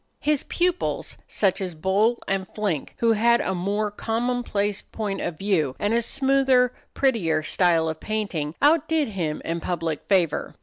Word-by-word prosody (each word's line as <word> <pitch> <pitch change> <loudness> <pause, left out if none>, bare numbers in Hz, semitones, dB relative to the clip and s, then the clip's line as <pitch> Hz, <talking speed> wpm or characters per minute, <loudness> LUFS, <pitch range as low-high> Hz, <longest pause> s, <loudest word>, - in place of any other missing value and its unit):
His 300 -2 +1
pupils, 360 0 -1
such 195 -1 +1
as 180 -3 -3
Bol 200 +8 +1
and 190 -1 -1
Flinck, 200 -9 -2
who 230 -1 +3
had 235 +2 +4
a 190 - -1
more 205 +4 -1
commonplace 225 -2 -1
point 210 -3 -4
of 160 - -3
view, 160 -9 0
and 205 +2 0
a 235 - +3
smoother, 265 0 +2 0.2
prettier 175 - +1
style 165 -1 +2
of 160 0 -3
painting, 185 -8 -3
outdid 315 -1 +3
him 170 -7 -3
in 165 +1 -2
public 165 -3 -2
favor. 175 -6 +1
205 Hz, 150 wpm, -24 LUFS, 175-235 Hz, 0.2 s, had